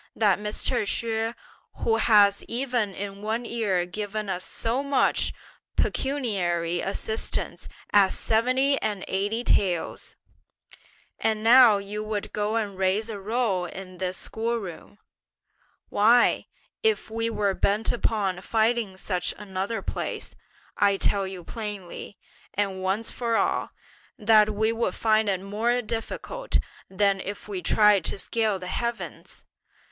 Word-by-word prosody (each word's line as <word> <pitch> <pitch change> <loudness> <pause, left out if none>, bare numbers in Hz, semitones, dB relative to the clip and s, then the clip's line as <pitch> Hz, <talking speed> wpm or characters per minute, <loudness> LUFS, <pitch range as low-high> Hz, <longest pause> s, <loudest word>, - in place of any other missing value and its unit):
that 205 -4 +3
Mr. 210 +4 -1
Hsüeh, 225 +2 -1 0.5
who 225 -1 +3
has 205 -3 +5
even 240 -5 -1
in 200 0 -6
one 220 +3 -2
year 205 -7 0
given 210 +2 -4
us 185 -1 -2
so 230 +7 -1
much 280 -1 +2 0.4
pecuniary 180 -11 0
assistance 220 +3 -2 0.2
as 200 -2 +5
seventy 255 +5 +2
and 205 -3 -2
eighty 205 +5 -1
taels! 180 -7 0 1.0
And 220 -1 0
now 235 -2 +8
you 205 +2 -5
would 215 -1 -4
go 210 +1 -1
and 205 -4 -2
raise 200 +4 +1
a 205 - -5
row 205 -3 0
in 185 0 -9
this 185 0 -2
school 230 +1 -2
room! 195 -1 -8 0.9
why, 230 +4 +4 0.3
if 440 - +1
we 225 +1 -1
were 205 -3 0
bent 205 +3 +1
upon 200 -6 0
finding 220 -2 +1
such 180 -2 -1
another 200 +2 -3
place, - - -4 0.4
I 200 -1 +3
tell 195 0 +1
you 190 -2 -7
plainly, 205 -2 -7 0.4
and 195 -2 -1
once 195 +4 -1
for 235 -2 -1
all, - - 0 0.5
that 215 -2 +5
we 220 +2 +1
would 230 +1 -1
find 220 -1 +2
it 190 -2 0
more 225 +5 0
difficult 230 - -3 0.3
than 195 0 +2
if 200 +2 -6
we 195 -3 -4
tried 210 -3 +4
to - - -1
scale 220 -1 0
the 185 - -8
heavens! 235 +5 -4
210 Hz, 130 wpm, -26 LUFS, 195-230 Hz, 1.0 s, now